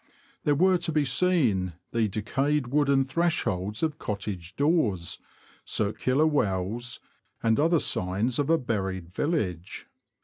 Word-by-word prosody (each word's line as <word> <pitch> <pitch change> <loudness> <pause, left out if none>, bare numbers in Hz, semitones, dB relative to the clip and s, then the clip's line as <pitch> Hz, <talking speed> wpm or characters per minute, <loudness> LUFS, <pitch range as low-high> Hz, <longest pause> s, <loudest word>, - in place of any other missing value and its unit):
There 145 -2 +3
were 185 +4 +4
to 165 - -1
be 150 -2 +2
seen 125 - +1 0.2
the 115 -2 +1
decayed 135 +7 -1
wooden 140 -1 +3
thresholds 130 - -1
of 155 -1 -1
cottage 100 -4 -5
doors, 140 - +1 0.4
circular 130 +7 +1
wells, 120 -4 -1 0.4
and 115 +2 +3
other 165 +2 +4
signs 100 +7 0
of 145 +1 0
a 165 - +5
buried 95 - -3
village. 95 - -2
125 Hz, 125 wpm, -27 LUFS, 100-150 Hz, 0.4 s, a